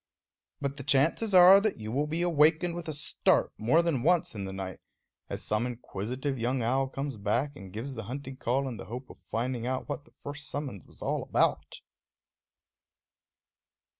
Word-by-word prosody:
But 140 Hz, -1 st, -3 dB
the 140 Hz, -, -5 dB
chances 155 Hz, -, +2 dB
are 185 Hz, +2 st, +9 dB
that 215 Hz, -1 st, 0 dB
you 110 Hz, 0 st, -6 dB
will 145 Hz, +5 st, 0 dB
be 165 Hz, +3 st, 0 dB
awakened 165 Hz, +1 st, +4 dB
with 175 Hz, -1 st, -6 dB
a -, -, -2 dB
start 150 Hz, -, +1 dB
more 130 Hz, +10 st, +4 dB
than 160 Hz, -7 st, 0 dB
once 175 Hz, +3 st, +2 dB
in 100 Hz, -3 st, -5 dB
the 95 Hz, -, -5 dB
night, 95 Hz, -2 st, -6 dB, 0.5 s
as -, -, -5 dB
some 110 Hz, +3 st, 0 dB
inquisitive 125 Hz, +3 st, -4 dB
young 125 Hz, +2 st, 0 dB
owl 130 Hz, +3 st, +1 dB
comes 135 Hz, -1 st, -4 dB
back 120 Hz, +8 st, 0 dB
and 95 Hz, -9 st, -10 dB
gives 115 Hz, +7 st, -5 dB
the 115 Hz, -3 st, -6 dB
hunting 135 Hz, +3 st, -6 dB
call 135 Hz, +2 st, 0 dB
in 120 Hz, -4 st, -5 dB
the -, -, -8 dB
hope 125 Hz, +5 st, -7 dB
of -, -, -16 dB
finding 120 Hz, +1 st, -2 dB
out 130 Hz, 0 st, -2 dB
what 145 Hz, -1 st, -5 dB
the -, -, -24 dB
first 145 Hz, 0 st, -6 dB
summons 135 Hz, -, -5 dB
was -, -, -12 dB
all -, -, 0 dB
about. -, -, 0 dB
135 Hz, 185 wpm, -29 LUFS, 115-150 Hz, 0.5 s, are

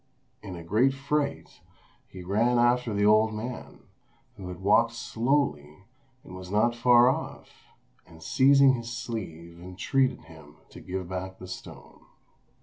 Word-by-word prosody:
In 95 Hz, -3 st, -8 dB
a 85 Hz, -, -9 dB
great 115 Hz, +10 st, +2 dB
fright, 140 Hz, +1 st, -3 dB, 0.5 s
he 95 Hz, -1 st, -11 dB
ran 110 Hz, +7 st, +1 dB
after 120 Hz, 0 st, +2 dB
the 105 Hz, 0 st, 0 dB
old 110 Hz, +1 st, +4 dB
man, 120 Hz, +4 st, -7 dB, 0.5 s
who 95 Hz, -, -9 dB
had 90 Hz, -1 st, -8 dB
walked 115 Hz, +4 st, +3 dB
slowly 115 Hz, -, -2 dB, 0.4 s
and 90 Hz, -, -13 dB
was 95 Hz, 0 st, -9 dB
not 105 Hz, +4 st, +2 dB
far 120 Hz, 0 st, +5 dB
off, 130 Hz, -, -4 dB, 0.4 s
and 80 Hz, -2 st, -15 dB
seizing 135 Hz, 0 st, +5 dB
his 120 Hz, -2 st, -5 dB
sleeve 85 Hz, -9 st, -7 dB
entreated 105 Hz, +9 st, -1 dB
him -, -, -16 dB
to -, -, -13 dB
give 95 Hz, -1 st, -5 dB
back 95 Hz, +1 st, -6 dB
the 90 Hz, -, -11 dB
stone. 95 Hz, -, -11 dB
110 Hz, 145 wpm, -27 LUFS, 95-125 Hz, 0.5 s, far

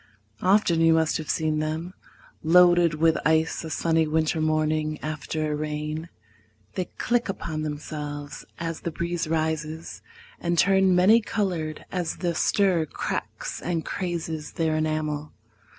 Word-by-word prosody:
Often 185 Hz, -3 st, +3 dB
you 165 Hz, 0 st, +5 dB
must 160 Hz, -1 st, +2 dB
have 155 Hz, -, -7 dB
seen 155 Hz, -1 st, +1 dB
them 160 Hz, +4 st, -3 dB, 0.5 s
Loaded 175 Hz, -1 st, +5 dB
with 160 Hz, +1 st, +3 dB
ice 160 Hz, +1 st, +2 dB
a 160 Hz, -, -5 dB
sunny 160 Hz, 0 st, +1 dB
winter 160 Hz, +1 st, +1 dB
morning 155 Hz, 0 st, +1 dB
After 155 Hz, 0 st, -3 dB
a -, -, 0 dB
rain. 150 Hz, +2 st, -4 dB, 0.6 s
They 185 Hz, -, -2 dB
click 240 Hz, -2 st, 0 dB
upon 160 Hz, -5 st, -3 dB
themselves 145 Hz, -1 st, -5 dB
As 165 Hz, -1 st, -4 dB
the -, -, -2 dB
breeze 170 Hz, 0 st, -2 dB
rises, 160 Hz, 0 st, -2 dB, 0.4 s
and 170 Hz, 0 st, -1 dB
turn 190 Hz, -1 st, +4 dB
many 205 Hz, +6 st, +6 dB
colored 180 Hz, -8 st, -2 dB
As 180 Hz, -3 st, -2 dB
the 175 Hz, -2 st, -1 dB
stir 180 Hz, -2 st, +2 dB
cracks -, -, -4 dB
and 170 Hz, -2 st, -2 dB
crazes 165 Hz, -4 st, -4 dB
their 160 Hz, -3 st, 0 dB
enamel. 155 Hz, -1 st, -2 dB
160 Hz, 135 wpm, -25 LUFS, 155-175 Hz, 0.6 s, many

